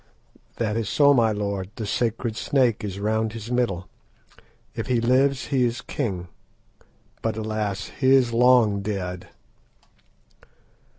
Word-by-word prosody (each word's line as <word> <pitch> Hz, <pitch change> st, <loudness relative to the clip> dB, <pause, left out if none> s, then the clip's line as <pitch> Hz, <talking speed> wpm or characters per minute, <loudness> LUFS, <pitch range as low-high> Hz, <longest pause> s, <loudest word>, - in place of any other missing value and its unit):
"That 110 Hz, -2 st, -1 dB
is 115 Hz, -3 st, -2 dB
so, 145 Hz, -1 st, +5 dB
my 115 Hz, -4 st, +3 dB
lord; 100 Hz, -2 st, -3 dB
the 110 Hz, -, -4 dB
sacred 115 Hz, +1 st, -1 dB
snake 120 Hz, -1 st, +1 dB
is 100 Hz, -2 st, -5 dB
round 110 Hz, +1 st, 0 dB
his 115 Hz, +1 st, -7 dB
middle. 115 Hz, -8 st, -1 dB, 0.9 s
If -, -, -5 dB
he 125 Hz, -2 st, +2 dB
lives 130 Hz, +3 st, +2 dB
he 135 Hz, -3 st, +2 dB
is 120 Hz, 0 st, -1 dB
king; 95 Hz, -10 st, -4 dB, 0.9 s
but, 110 Hz, -1 st, -2 dB
alas! 105 Hz, -2 st, -3 dB
he 135 Hz, -1 st, +5 dB
is 125 Hz, -3 st, +2 dB
long 120 Hz, -4 st, +4 dB
dead." 95 Hz, -3 st, -4 dB
110 Hz, 130 wpm, -24 LUFS, 105-125 Hz, 0.9 s, so